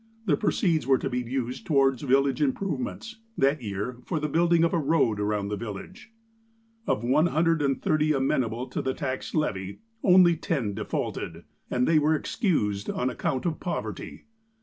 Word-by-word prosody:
The 165 -8 +3
proceeds 160 0 +1
were 135 -1 +5
to - - -3
be 125 - 0
used 125 +1 -4
towards 135 -4 +3
village 135 0 +2
improvements; 155 - -2 0.2
that 140 +1 +2
year 105 +3 -4
for 165 - -2
the 150 - -1
building 170 +2 +3
of 170 - +2
a 170 - +2
road 140 -8 +2
around 105 -1 -1
the 105 - -1
village. 115 - -8 0.8
Of 105 - 0
one 135 +7 +3
hundred 165 -1 +2
and 135 -2 +1
thirty 155 0 +1
amenable 130 -4 0
to - - -3
the 130 0 -2
tax 130 -1 -4
levy, 100 -11 -1 0.3
only 180 -3 +6
ten 140 - -2
defaulted, 105 +1 -4 0.3
and 125 0 +1
they 160 -2 +5
were 155 +1 +3
excused 105 - -1
on 125 +1 -1
account 130 +3 -2
of 165 -3 -1
poverty. 175 - -5
135 Hz, 170 wpm, -26 LUFS, 120-160 Hz, 0.8 s, only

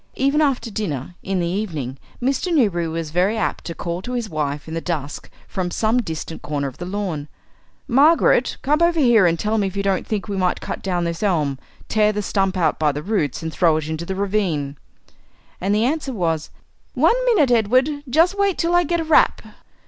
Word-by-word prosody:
Even 275 +3 +2
after 265 -5 0
dinner, 175 - -4
in 190 -1 -2
the 175 - 0
evening, 160 - -3 0.2
Mr. 270 +8 0
Newberry 200 - +2
was 160 -1 -4
very 185 +6 +1
apt 215 - -2
to 170 - -5
call 170 +2 -4
to 245 +6 -6
his 235 -4 -3
wife 150 -1 -3
in 160 - -6
the 165 - -2
dusk 150 -5 -4 0.2
from 185 -2 -3
some 225 +6 +1
distant 160 -4 -6
corner 145 -2 -2
of 130 - -9
the 175 - -5
lawn: 185 -7 -3 0.6
"Margaret, 295 +7 +4
come 300 +4 +2
over 340 -1 +3
here 235 -9 +5
and 170 0 +1
tell 215 +5 0
me 200 - +1
if 190 +1 -6
you 200 - 0
don't 195 -2 0
think 210 -2 -2
we 200 - -3
might 180 -1 +1
cut - - -5
down 180 -2 -1
this 170 -1 -3
elm, 155 -10 0 0.3
tear 215 -1 +3
the 210 0 -3
stump 195 -1 0
out 160 -4 +1
by 155 -1 +3
the 145 +1 -5
roots, 175 - -1
and 160 -1 -4
throw 165 -3 +3
it 155 -1 -3
into 160 +2 -4
the 190 - -2
ravine." 185 -8 -1 0.9
And 195 +3 +1
the 215 +2 +2
answer 285 0 -1
was, 165 -6 -1 0.5
"One - - +3
minute, 360 - +3
Edward; 240 +4 +3 0.2
just 330 +9 +3
wait 400 -2 +2
till 335 +1 0
I 350 0 +5
get 340 +1 0
a - - -2
wrap." 315 0 +3
195 Hz, 210 wpm, -21 LUFS, 165-245 Hz, 0.9 s, here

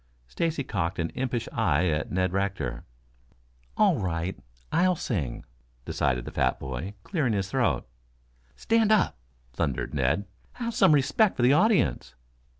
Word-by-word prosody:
Stacy 160 - -1
cocked 95 -8 -2
an 80 -1 -2
impish 125 -3 -2
eye 90 -7 +2
at 75 0 -2
Ned 95 0 0
Rector. 95 -11 -2 0.9
"All - - +4
right, 90 0 -2 0.4
I'll 180 +2 +3
sing," 80 - -3 0.4
decided 65 -3 -1
the - - -6
fat - - 0
boy, 65 +10 -5
clearing 145 - 0
his 95 -2 -2
throat. - - +1 0.7
"Stand 225 -1 +2
up," 205 - +2 0.3
thundered 70 -3 -2
Ned. 75 +8 +1 0.3
"Have 235 -1 -4
some 155 - +5
respect 165 +9 +3
for 120 - +1
the 125 +3 +6
audience." 175 - +2
100 Hz, 140 wpm, -27 LUFS, -, 0.9 s, the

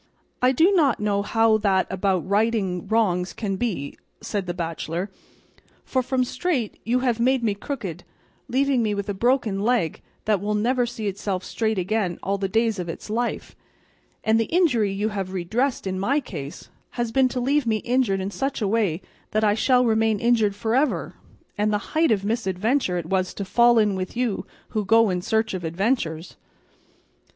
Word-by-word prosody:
"I 250 +1 +5
do 325 +9 +4
not 295 - +3
know 205 -1 +1
how 225 +1 +3
that 195 -3 +2
about 190 -2 0
righting 200 -3 0
wrongs 190 -5 +1
can 200 -3 -3
be," 185 - -3 0.2
said 200 -3 -3
the 175 - -2
bachelor, 170 +2 -3 0.7
"for 260 - 0
from 255 +1 0
straight 255 - -2
you 245 +3 +1
have 245 -3 +1
made 255 +1 +2
me 215 -3 +2
crooked, 200 - -6 0.4
leaving 270 0 +2
me 215 -2 0
with 200 +1 -4
a - - 0
broken 230 -1 +1
leg 215 -6 0 0.2
that 210 -3 +2
will 210 +1 -1
never 245 +3 +1
see 230 -2 -6
itself 195 -1 -2
straight 220 -2 -1
again 185 -1 -1
all 200 +1 -1
the 195 - 0
days 225 0 +1
of 175 -1 -4
its 165 - -7
life; 235 +2 -2 0.7
and 220 +1 +3
the 225 - +2
injury 255 - +2
you 205 +2 -1
have 195 -3 -4
redressed 220 +10 -1
in 190 -1 -2
my 265 +10 +2
case 150 - -8 0.3
has 240 -1 -1
been 265 +2 +4
to 250 - -3
leave 275 +1 +1
me 220 -1 +2
injured 235 -5 +1
in 190 +2 -3
such 270 +9 -2
a 210 - 0
way 195 -5 0 0.3
that 215 +1 0
I 205 -1 +4
shall 250 +4 +3
remain 220 -2 +2
injured 225 -3 +2
for 220 +2 -2
ever; 275 +4 +1 0.5
and 210 +1 +2
the 210 - +2 0.2
height 325 +1 +3
of 200 -3 +1
misadventure 215 0 0
it 170 - -3
was 185 +1 -1
to 200 - -4
fall 235 +4 +4
in 210 -2 +3
with 185 +4 -5
you 245 -5 -1 0.2
who 215 - -1
go 225 +1 +4
in 180 -1 -1
search 220 +3 0
of 185 -2 -4
adventures." 170 -2 -1
215 Hz, 185 wpm, -24 LUFS, 190-240 Hz, 0.7 s, I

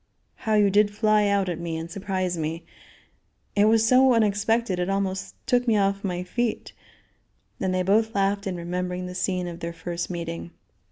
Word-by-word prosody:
How 220 -1 -1
you 205 -2 +4
did 205 +1 +4
fly 215 0 +2
out 200 -1 +1
at 175 -2 -3
me 170 -1 -3
and 165 +1 -6
surprise 185 -1 -2
me. 165 +1 -4 0.9
It 205 0 +5
was 225 +1 +4
so 255 +1 +5
unexpected 215 -1 +1
it 180 +1 -1
almost 195 -1 -2
took 245 -1 +1
me 225 -2 +4
off 195 0 +1
my 180 -2 -2
feet," 235 +5 -2 0.9
and 190 - 0
they 185 0 +1
both 220 +4 +2
laughed 200 +1 +1
in 185 - -2
remembering 180 +1 -3
the 180 - -6
scene 180 -1 -1
of 170 -1 -7
their 170 0 -5
first 170 +1 -4
meeting. 170 -1 -5
195 Hz, 180 wpm, -25 LUFS, 180-210 Hz, 0.9 s, It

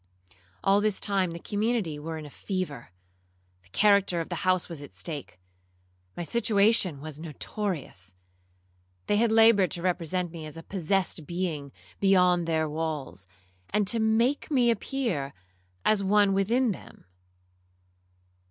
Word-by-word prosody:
All 195 +1 +4
this 210 -2 +1
time 195 -3 0
the 170 - -6
community 205 -4 -1
were 160 +2 -5
in 155 - -7
a 145 - -11
fever—the 90 - -8
character 200 - +4
of 165 - -4
the 175 - -3
house 185 -1 +2
was 165 -4 -7
at 145 - -11
stake—my 90 - -9
situation 205 -5 +3
was 155 -1 -8
notorious. 155 - -5 0.9
They 205 - +2
had 230 +1 +3
laboured 225 -4 +6
to 170 - -2
represent 180 -1 -1
me 160 -2 -7
as 155 - -10
a 165 - -8
possessed 185 -4 -1
being 170 -6 -3 0.3
beyond 180 -3 +4
their 160 -1 +1
walls, 150 - -4 0.4
and 210 -2 +1
to 230 - +2
make 225 +5 +1
me 250 -5 +3
appear 225 - -2 0.5
as 205 -2 +3
one 200 0 +4
within 225 +5 +2
them. 180 - -10
175 Hz, 135 wpm, -27 LUFS, 145-205 Hz, 0.9 s, laboured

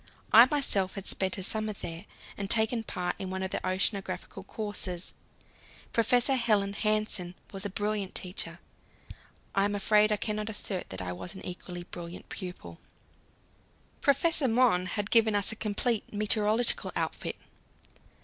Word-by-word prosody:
I 230 +2 +11
myself 205 -10 +1
had 195 -1 -4
spent 190 0 +1
a 190 - -2
summer 215 +2 0
there, 170 0 -7 0.3
and 200 -1 -4
taken 225 +1 +4
part 180 -4 -3
in 190 - -4
one 190 0 -3
of 190 - -3
the - - -1
oceanographical 190 0 -2
courses. 200 -4 -4 0.8
Professor 245 +3 +4
Helland 210 -5 +2
Hansen 215 -4 +1 0.2
was 195 +1 -4
a - - -7
brilliant 205 0 -2
teacher; 180 -2 -4 1.0
I 195 - +3
am 205 0 +1
afraid 210 +1 +4
I 210 - +2
cannot 215 0 -2
assert 205 -3 -4
that 95 0 -5
I 90 - -3
was 130 - -6
an 190 - -9
equally 180 0 -7
brilliant 175 0 -9
pupil. 180 - -7 1.2
Professor 285 +1 +3
Mohn 225 -6 +3
had 205 +2 -3
given 225 -2 +5
us 200 +1 +4
a - - -5
complete 220 +1 -1
meteorological 215 +2 +1
outfit. - - -2
205 Hz, 150 wpm, -29 LUFS, 185-220 Hz, 1.2 s, I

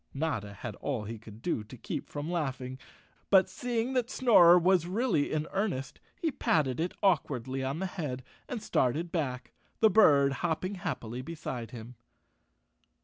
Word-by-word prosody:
Notta 125 -9 -2
had 110 +2 -6
all 130 -7 -3
he 110 +1 -6
could 110 +1 -13
do 120 -11 -1
to 125 +4 -11
keep - - -5
from 145 +3 -4
laughing, 130 -6 -3 0.5
but 190 -1 +6
seeing 240 +5 -2
that 250 -2 0
Snorer 180 -10 +7
was 175 -1 +3
really 190 - +1
in 155 0 0
earnest, 185 - -2 0.2
he 325 - -1
patted 150 - +1
it 175 +2 -2
awkwardly 135 -8 +1
on 135 +3 -2
the 190 - -2
head, 150 -9 -4 0.3
and 235 -4 -4
started 160 - 0
back, 130 -7 -3 0.3
the 220 -1 +5
bird 145 -10 +6
hop¬ 165 -2 0
ping 185 +2 -3
happily 125 - -4
beside 130 -6 -6
him. 120 +1 -9
155 Hz, 160 wpm, -30 LUFS, 130-185 Hz, 0.5 s, Snorer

